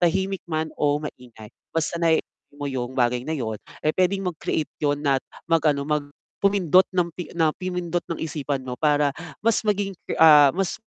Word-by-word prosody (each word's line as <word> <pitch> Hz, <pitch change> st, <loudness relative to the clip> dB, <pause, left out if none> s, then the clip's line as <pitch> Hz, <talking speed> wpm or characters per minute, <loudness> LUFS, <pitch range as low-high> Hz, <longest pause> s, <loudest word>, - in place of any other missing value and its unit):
Tahimik 190 Hz, +2 st, +1 dB
man 155 Hz, -1 st, -2 dB
o 145 Hz, -1 st, +3 dB
maingay, 125 Hz, -7 st, -9 dB, 0.2 s
mas 165 Hz, 0 st, 0 dB
sanayin 165 Hz, -1 st, +2 dB, 0.3 s
mo 145 Hz, -, -5 dB
'yong 130 Hz, -2 st, -4 dB
bagay 125 Hz, -1 st, +2 dB
na 155 Hz, +5 st, -3 dB
'yon 110 Hz, -6 st, -4 dB, 0.2 s
eh, 155 Hz, -, +3 dB
puwedeng 185 Hz, 0 st, +1 dB
mag-create 155 Hz, -1 st, -3 dB
'yon 145 Hz, 0 st, 0 dB
at 135 Hz, -2 st, +3 dB, 0.2 s
mag-ano, 150 Hz, -4 st, +2 dB
mag 150 Hz, -1 st, -1 dB, 0.3 s
pumindot 190 Hz, -2 st, +4 dB
nang 180 Hz, -2 st, 0 dB
pi 175 Hz, +1 st, -7 dB
na 160 Hz, -2 st, +3 dB
pumindot 180 Hz, -1 st, -3 dB
ng 170 Hz, -, -3 dB
isipan 145 Hz, -4 st, -3 dB
mo 125 Hz, -1 st, -6 dB
para 145 Hz, -2 st, +3 dB, 0.3 s
mas 230 Hz, -1 st, +3 dB
maging 205 Hz, -2 st, 0 dB, 0.2 s
ke -, -, -2 dB
ah, 150 Hz, -3 st, +8 dB
mas 195 Hz, -2 st, -1 dB
155 Hz, 175 wpm, -24 LUFS, 145-180 Hz, 0.3 s, ah